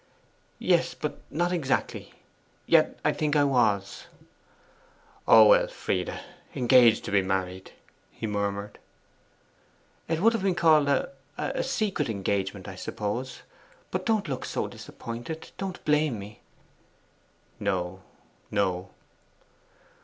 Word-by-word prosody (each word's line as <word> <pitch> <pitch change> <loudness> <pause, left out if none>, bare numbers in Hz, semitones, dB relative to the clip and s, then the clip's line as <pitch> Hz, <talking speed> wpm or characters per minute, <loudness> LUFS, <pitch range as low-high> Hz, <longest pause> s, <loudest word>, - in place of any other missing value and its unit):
'Yes 170 -1 +1
but 150 - -5
not 175 +4 0
exactly. 145 -7 -1 0.5
Yet - - +3
I - - +3
think 150 -1 -1
I 145 - +5
was.' 110 -8 +1 1.2
'O - - +8
Elfride, - - +1 0.4
engaged 125 -3 +5
to - - -4
be 100 -1 +4
married!' 95 0 -3 0.4
he - - -7
murmured. 100 -1 -3 1.3
'It 165 0 0
would 225 +5 +4
have 230 - -1
been 190 -2 +1
called 155 -4 +4
a 140 0 -2
secret 210 - -1
engagement, 100 -2 -2
I 95 -2 -8
suppose. 110 +7 -4 0.5
But - - -3
don't 220 -5 +1
look 130 -3 -3
so - - -2
disappointed; 120 +8 -8
don't 190 -2 -5
blame 150 -4 +2
me.' 105 +1 -10 1.2
'No, 90 0 -2 0.5
no. 95 -3 -1
130 Hz, 110 wpm, -27 LUFS, 100-165 Hz, 1.3 s, O